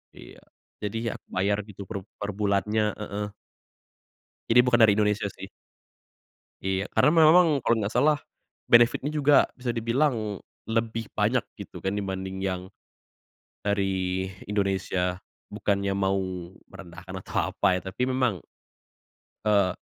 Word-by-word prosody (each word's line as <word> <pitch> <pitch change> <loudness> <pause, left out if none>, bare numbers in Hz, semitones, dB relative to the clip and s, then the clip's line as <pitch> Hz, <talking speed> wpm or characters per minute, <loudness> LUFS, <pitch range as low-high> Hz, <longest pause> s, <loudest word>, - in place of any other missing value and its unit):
iya. - - -13 0.4
Jadi 115 +2 -3
ya, - - -8
bayar 100 +3 0
gitu 100 -1 -9
per 100 0 -5 0.2
per 105 0 -4
bulannya 105 +1 0
heeh. 105 -1 -4 1.2
Ini 120 +2 +6
bukan 125 -1 +3
dari 110 -3 +6
Indonesia 105 -1 +1
sih. - - -9 1.2
Iya, 95 +1 -1
karena - - +4
me 165 - +5
memang 175 +2 +7
kalau 115 - +2
nggak 105 +1 -2
salah, 150 0 +4 0.5
benefit-nya 120 +5 +4
juga 145 -1 +5
bisa 125 -1 -5
dibilang 115 - 0 0.2
lebih 115 0 -1
banyak - - +1
gitu - - -10
kan 95 +1 -2
dibanding 95 -1 -4
yang 95 -2 -2 1.0
dari 95 -2 0 0.2
Indonesia. 95 -2 -1 0.3
Bukannya 100 -2 0
mau 95 0 +1 0.6
merendahkan 90 0 -11
atau - - -2
apa 90 - +2
ya, 90 - -3
tapi 125 +4 -1
memang, 130 0 0 1.0
eee, 100 -4 +3
105 Hz, 125 wpm, -26 LUFS, 95-115 Hz, 1.2 s, memang